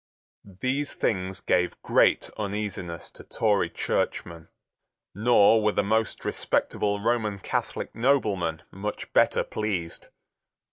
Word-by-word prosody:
These 130 +9 -3
things 95 -2 -1
gave 90 0 +1
great - - +3
uneasiness 100 -5 -4
to - - -13
Tory 105 -3 +1
churchmen. 85 -1 -2 0.7
Nor 110 +1 +5
were 105 0 +2
the - - +1
most 110 +2 0
respectable 100 0 0
Roman 110 -2 0
Catholic 95 - -3
noblemen 105 - +1
much 105 +2 -6
better - - +4
pleased. 95 -6 -4
105 Hz, 105 wpm, -26 LUFS, 95-110 Hz, 0.7 s, Nor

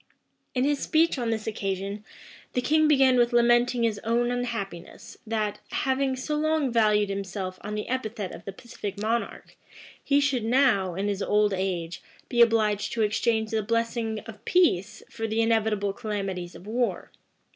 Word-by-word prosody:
In 250 - +2
his 290 0 +1
speech 320 -2 +2
on 235 -2 -1
this 220 -1 -2
occasion, 200 -1 -3 0.5
the 250 - +1
king 310 +4 +3
began 270 -4 +5
with 240 0 +3
lamenting 240 0 +3
his 220 -3 0
own 240 +2 0
unhappiness, 230 -8 -5
that, 215 -2 -1
having 265 0 0
so 260 +4 -4
long 310 -3 +1
valued 210 -3 +3
himself 195 -1 -4
on 210 +1 -5
the 210 - -4
epithet 220 -6 -3
of - - -10
the 195 - -4
pacific 205 -2 -7
monarch, 225 +3 -3 0.5
he 280 0 +3
should 275 -5 +1
now, 225 -7 +2
in 195 +2 -1
his 200 -1 -2
old 210 0 +2
age, 175 -3 -3 0.3
be 240 -1 +3
obliged 215 -3 +3
to 225 - +1
exchange 220 +1 0
the 220 -1 +1
blessings 230 0 -1
of 215 -2 -11
peace 220 - +2
for 225 - -4
the 220 +1 -1
inevitable 220 -3 +1
calamities 195 -5 -4
of 180 - -12
war. 240 +3 -2
220 Hz, 165 wpm, -26 LUFS, 205-245 Hz, 0.5 s, began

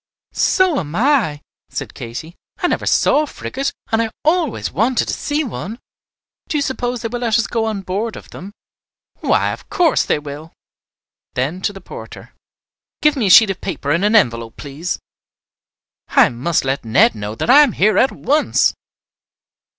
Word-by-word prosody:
"So 370 -6 +2
am 155 0 -6
I," 225 - +2 0.3
said - - -6
Katy. 130 +9 -7 0.2
"I - - -2
never - - 0
saw 295 - +3
a 305 - -2
frigate, 275 0 -4 0.2
and 225 0 +2
I 225 - -1 0.2
always 320 -4 +1
wanted 240 +4 +1
to - - -1
see 295 +1 -1
one. 225 -4 -6 0.7
Do 305 - 0
you 285 - +1
suppose 245 -3 -3
they - - 0
will 240 +2 -4
let 235 -2 +1
us 230 - +1
go 225 -1 -1
on 215 -3 -3
board 205 +5 -3
of - - -12
them?" 195 +3 -9 0.7
"Why, - - +1
of - - -9
course 340 -4 +3
they - - +1
will." 150 +2 -9 0.8
Then 145 +9 -2
to 205 - 0
the 195 -1 -11
porter, - - -11 0.7
"Give 300 0 +4
me 240 -7 0
a - - +2
sheet 215 +2 +8
of 190 - -7
paper 145 - -3
and 170 +5 +1
an 210 +2 +3
envelope, 115 - +2
please. 150 +5 -4 1.1
I - - +5
must 135 +6 -1
let 135 +1 -1
Ned 110 0 +4
know 105 0 -6
that 230 - +1
I 290 +3 +9
am 280 -7 +3
here 205 0 +3
at 265 - +3
once." 300 +2 +1
215 Hz, 180 wpm, -18 LUFS, -, 1.1 s, I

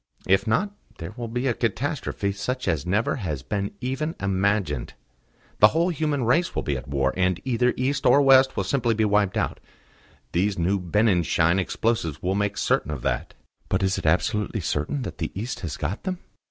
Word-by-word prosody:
"If 95 +4 +3
not, 155 - +1 0.3
there 85 +5 -7
will 120 -1 -5
be 125 +3 -3
a 125 - +2
catastrophe 115 -3 -2
such 125 +5 -3
as 80 -4 0
never 105 +8 +1
has 75 - -4
been 100 -1 -2
even 150 +6 -2
imagined. 95 - 0 0.6
The 105 - +9
whole 165 +9 +1
human 150 -5 -1
race 165 +9 +2
will - - -1
be 70 - -1
at 65 - -6
war, 70 -1 0
and 90 -2 +1
either 125 -1 +2
East 135 +2 0
or 140 - +6
West 135 -1 +5
will - - +1
be - - -6
simply 115 -5 +1
wiped 105 0 +2
out. 105 - -1 0.7
These 95 +3 +1
new 95 +4 +1
Benninschein 90 -2 +2
explosives 95 -6 -1
will 90 +1 -1
make 100 0 -1
certain - - +1
of 75 -5 -5
that." - - -2 0.3
"But 95 +1 +1
is 95 0 +1
it - - -3
absolutely 105 +5 +1
certain 80 - -2
that - - -7
the 80 - -2
East 115 +4 -4
has 80 -7 -5
got 85 +9 -3
them?" 185 -1 -3
105 Hz, 190 wpm, -25 LUFS, 90-125 Hz, 0.7 s, The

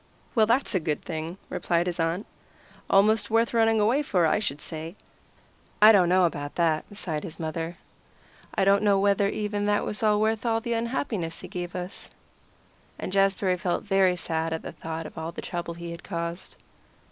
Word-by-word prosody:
"Well, 220 -2 +4
that's 235 +2 +1
a 185 - +2
good 155 -3 -2
thing," 165 +1 -4
replied 170 0 0
his 180 -1 -3
aunt. 165 +5 0 0.6
"Almost 205 +1 +4
worth 230 +1 +2
running 225 -1 +3
away 230 +7 +3
for, 185 - +2
I 160 - +3
should 145 -9 -2
say." 160 +3 -7 0.8
"I 215 +1 +9
don't 185 -5 +5
know 185 0 +5
about 145 -4 -3
that," 160 -3 +1
sighed 165 -6 -3
his 165 -4 -8
mother. 165 +1 -4 0.8
"I 195 - +2
don't 200 0 +5
know 200 -2 +3
whether 200 0 +3
even 205 -1 -2
that 205 0 +2
was 210 - -4
worth 215 0 +2
all 225 -2 +1
the 235 +1 -2
unhappiness 230 -7 -2
he - - -8
gave 175 0 -5
us." 180 +1 -6 0.9
And 185 - -5
Jazbury 195 -1 +2
felt 175 0 -1
very 195 -2 +3
sad 165 -1 -2
at 160 - -4
the - - -6
thought 160 0 -6
of 155 - -8
all 160 +1 -4
the - - -7
trouble 170 -1 -4
he 170 0 -7
had 170 +1 -9
caused. 170 0 -5
185 Hz, 185 wpm, -26 LUFS, 165-210 Hz, 0.9 s, I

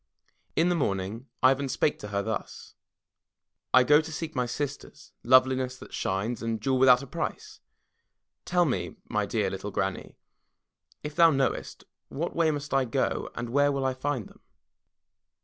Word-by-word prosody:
In 170 +2 +3
the - - +3
morning 105 - -2 0.2
Ivan 135 +1 +4
spake 145 - 0
to 105 - -7
her 100 -1 -2
thus: 110 -1 -5 1.0
"I 130 - +7
go 150 +4 +5
to 160 0 -8
seek 160 +1 -5
my 125 -1 -1
sisters, 140 +3 -6
Loveliness 130 0 +3
That - - -13
Shines, 105 +5 -2
and 115 -1 -2
Jewel 130 +4 0
Without 130 0 +6
A - - -7
Price. - - -5 0.8
Tell 175 -1 +2
me, 135 - -2
my - - 0
dear - - 0
little - - -5
Granny, - - -3 0.9
if 150 0 -6
thou 170 -1 +7
know 135 -3 +2
est, - - -9 0.3
what 165 +5 -4
way 165 -1 +3
must 145 -1 -3
I 135 -1 +3
go 115 - -1
and 120 0 -5
where 145 +2 +3
shall 135 -1 -1
I 130 - +1
find 130 -4 -3
them?" - - -20
130 Hz, 165 wpm, -27 LUFS, 120-145 Hz, 1.0 s, I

